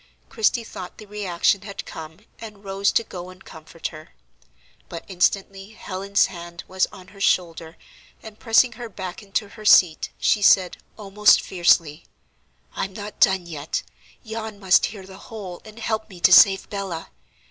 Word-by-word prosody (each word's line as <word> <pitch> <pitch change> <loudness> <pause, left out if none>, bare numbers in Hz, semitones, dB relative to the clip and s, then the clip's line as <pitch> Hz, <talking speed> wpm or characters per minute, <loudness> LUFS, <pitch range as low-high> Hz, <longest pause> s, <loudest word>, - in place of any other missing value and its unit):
Christie 230 +1 +1
thought 185 -4 -9
the 215 - -11
reaction 200 -2 0
had 200 -1 -8
come, 160 +3 -10 0.2
and 210 -3 -11
rose 195 0 0
to 230 - +2
go 180 -4 -9
and 185 +1 -15
comfort 160 +1 -8
her. 155 0 -14 0.7
But 170 -1 -8
instantly 195 +2 -1
Helen's 200 -1 0
hand 170 -1 -9
was 190 0 0
on 185 -1 -14
her 200 0 -14
shoulder, 165 -3 0 0.5
and 220 -1 -12
pressing 240 +1 +4
her 240 -1 -8
back 190 +1 -7
into 205 0 -3
her 215 +1 -13
seat, 180 -6 +5
she 210 - +2
said, 190 -2 +4 0.2
almost 210 0 +4
fiercely: 170 -4 +1 0.7
"I'm 195 - -3
not 205 +1 -8
done 190 -3 +3
yet; 155 -3 -4 0.4
yon 220 -2 -6
must 190 -2 +4
hear 200 -3 -10
the 190 0 -12
whole, 195 -6 -8
and 215 0 -13
help 220 -1 -3
me 185 -3 -12
to 185 - +6
save 195 0 +7
Bella. 195 - -5
195 Hz, 160 wpm, -23 LUFS, 180-210 Hz, 0.7 s, save